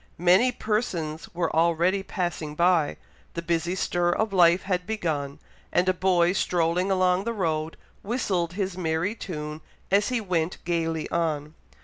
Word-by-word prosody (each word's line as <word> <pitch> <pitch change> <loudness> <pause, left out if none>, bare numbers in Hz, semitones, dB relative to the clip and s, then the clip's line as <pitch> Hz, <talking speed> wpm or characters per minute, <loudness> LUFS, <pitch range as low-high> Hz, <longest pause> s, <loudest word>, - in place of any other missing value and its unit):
Many 185 +9 +4
persons 180 -10 -2
were 170 -2 -1
already 170 +4 +2
passing 175 -6 -3
by 170 -2 +2 0.4
the 170 - -2
busy 170 +1 0
stir 175 -1 0
of 210 +4 0
life 175 -1 +5
had 180 -1 -2
begun, 155 -10 -2 0.3
and 180 +1 +2
a 185 - +4
boy 180 -1 +2
strolling 180 0 +1
along 185 -1 +2
the 235 +2 -2
road 160 -5 -2 0.2
whistled 190 -7 -1
his 190 -1 -2
merry 170 +2 -1
tune 155 -7 -6 0.3
as 205 +3 +3
he 250 -2 0
went 180 -5 -1
gaily 165 -2 -1
on. 155 -3 -1
175 Hz, 145 wpm, -26 LUFS, 165-190 Hz, 0.4 s, life